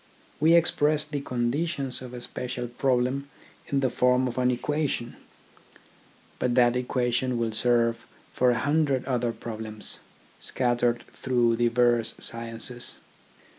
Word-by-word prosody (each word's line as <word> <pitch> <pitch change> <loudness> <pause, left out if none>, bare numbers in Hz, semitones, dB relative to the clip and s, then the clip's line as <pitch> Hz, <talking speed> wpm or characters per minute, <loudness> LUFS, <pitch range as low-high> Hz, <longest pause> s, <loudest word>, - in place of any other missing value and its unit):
We 160 +3 +6
express 150 -2 +3
the 150 -2 -4
conditions 135 +2 -2
of 125 -1 -8
a 120 - -7
special 125 0 -4
problem 130 +2 0 0.4
in 140 -1 0
the 130 - +2
form 125 +1 +3
of 125 +1 -3
an 125 0 +3
equation, 135 -1 -1 1.2
but 125 -1 +1
that 120 -1 +5
equation 125 0 0
will 115 -1 0
serve 115 +1 +2 0.3
for 125 - +3
a 120 - +2
hundred 145 -2 +1
other 120 -3 0
problems, 110 -2 -6 0.4
scattered 120 -1 +1
through 120 -3 +1
diverse 120 -1 +2
sciences. 115 +1 -4
125 Hz, 125 wpm, -27 LUFS, 120-135 Hz, 1.2 s, We